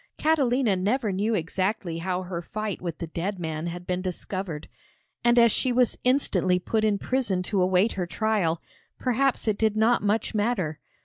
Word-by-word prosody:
Catalina 265 -8 +2
never 210 +4 0
knew 210 +4 0
exactly 180 0 -2
how 185 +1 -2
her 175 -2 -4
fight 215 +3 -4
with 170 -3 -4
the 170 - -4
dead 175 +5 -3
man 160 -1 -3
had 175 +1 -6
been 180 0 -1
discovered, 185 -3 -4 0.6
and 240 0 +4
as 235 -1 +7
she 255 - +1
was 245 -1 +2
instantly 195 -9 +2
put 215 +4 -1
in 210 -2 +2
prison 210 -6 0
to 195 +1 0
await 185 +4 +3
her 180 -2 -3
trial, 180 -4 0 0.3
perhaps 255 0 +1
it 210 -2 +1
did 220 -1 +2
not 225 +2 +3
much 210 +1 0
matter. 205 -8 0
200 Hz, 175 wpm, -26 LUFS, 180-230 Hz, 0.6 s, as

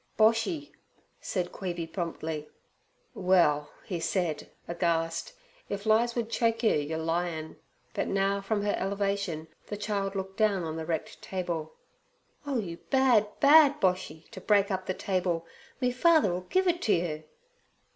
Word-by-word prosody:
'Boshy,' 230 +8 +2 0.5
said 180 -2 -2
Queeby 175 -3 -4
promptly. 160 -3 -4 0.6
'Well,' 170 -6 +3 0.3
said 165 -3 0
he, - - -16 0.2
aghast, 170 -1 -1 0.4
'if 200 +1 -4
lies 230 +2 +3
would 235 -2 -1
choke 230 0 0
yer, 220 - +5
yer 150 +2 -1
lyin'—' 165 -1 -2 0.4
But - - -1
now 195 0 +1
from 205 +1 -1
her 205 - +1
elevation 195 -4 -2 0.2
the 205 - -4
child 200 -1 -2
looked 190 0 -4
down 205 -4 +2
on 160 -1 -3
the 160 -1 -5
wrecked 160 -2 -3
table. 170 -4 -3 0.7
'Oh, 275 -3 0
you 175 -7 -3
bad, 255 -6 +4
bad 290 0 +7
Boshy, 180 -4 -1
t' - - -8
break 200 -1 +3
up 185 -1 -2
the 185 - -1
table! 180 -3 -1 0.3
Me 250 -1 +1
father 300 - +4
'll 180 +1 -5
give 375 0 +2
it 350 0 +1
to 215 - +3
you!' 155 -3 -2
190 Hz, 150 wpm, -29 LUFS, 165-220 Hz, 0.7 s, bad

